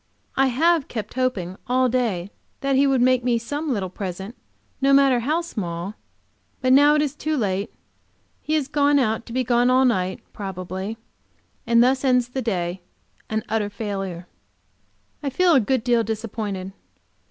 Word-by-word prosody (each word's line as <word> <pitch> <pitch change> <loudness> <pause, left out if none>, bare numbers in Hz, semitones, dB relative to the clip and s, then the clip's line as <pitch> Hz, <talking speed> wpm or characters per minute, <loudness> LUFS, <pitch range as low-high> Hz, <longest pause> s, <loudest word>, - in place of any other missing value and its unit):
I 270 0 +4
have 315 +4 +2
kept 215 -3 -5
hoping 200 -8 -2
all 255 +1 +3
day 220 -7 -1 0.3
that 275 -1 +1
he 275 +1 +4
would 265 -3 +3
make 255 -1 +3
me 240 -1 +2
some 290 +6 -3
little 200 -6 -1
present, 190 +3 -6 0.5
no 275 +1 +4
matter 275 -3 +5
how 305 +8 0
small, 185 - -5 0.7
but 255 0 +3
now 290 +2 +6
it 300 - +3
is 290 -2 -2
too 310 +1 -2
late; 200 -4 -1 0.7
he 310 - -1
has 295 -4 0
gone 285 0 +3
out 225 -4 0
to - - -9
be 255 +2 0
gone 245 0 +3
all 260 +1 +4
night, 185 -6 0
probably, 190 +2 -5 0.7
and 235 0 +5
thus 260 +2 +2
ends 250 -2 +2
the 260 +1 -3
day, 180 -5 -2 0.5
an 220 0 -1
utter 215 -1 -1
failure. 195 -4 -5 1.0
I 285 - -2
feel 350 +6 +3
a 275 - +6
good 255 +1 0
deal 240 -2 +2
disappointed. 215 -4 -4
240 Hz, 165 wpm, -23 LUFS, 200-270 Hz, 1.0 s, now